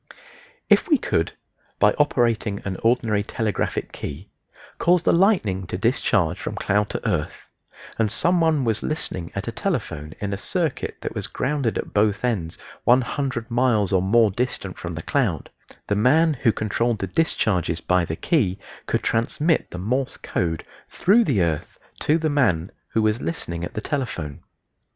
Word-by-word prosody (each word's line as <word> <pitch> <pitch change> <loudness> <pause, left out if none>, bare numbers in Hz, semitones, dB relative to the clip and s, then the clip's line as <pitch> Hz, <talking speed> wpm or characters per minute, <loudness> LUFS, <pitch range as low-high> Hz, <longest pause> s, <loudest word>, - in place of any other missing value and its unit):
If - - +4
we 305 - +6
could, 85 - -1 0.4
by 105 - +5
operating 115 -7 +1
an 95 -1 -2
ordinary 115 -3 +2
telegraphic 105 0 -2
key, 80 +8 -7 0.5
cause 175 0 +3
the - - +4
lightning 145 - +2
to - - -3
discharge - - +1
from - - -4
cloud 105 +1 +1
to - - -3
earth, 85 -8 -2 0.5
and 110 -2 +2
some 175 +9 +2
one 160 -4 +3
was 110 -3 0
listening 90 - -3
at - - -4
a - - -1
telephone 75 +1 -3
in 100 -1 -2
a 100 - -4
circuit 165 - -2
that - - -4
was - - -3
grounded 135 -4 -1
at - - -5
both 105 +2 +2
ends 95 -9 -1 0.3
100 125 -1 +1
miles 115 -5 +2
or 95 - +4
more 110 +3 +4
distant 125 +6 -3
from - - -6
the - - -6
cloud, - - 0 0.3
the 105 - 0
man 155 +9 +4
who 120 -4 +2
controlled 110 +2 0
the 95 - -2
discharges 90 - 0
by 90 +1 +2
the 80 -1 -3
key 100 - +1 0.3
could - - 0
transmit 150 +8 +1
the - - -7
Morse 125 +8 -1
code 80 -3 -2 0.2
through 220 +6 +4
the 105 - +2
earth 80 -3 -2 0.2
to 155 - +2
the 160 -1 0
man 105 - +1 0.2
who 110 - 0
was 110 +2 +1
listening 85 - -3
at - - -6
the 110 - -2
telephone. 110 - -3
110 Hz, 165 wpm, -23 LUFS, 95-135 Hz, 0.5 s, we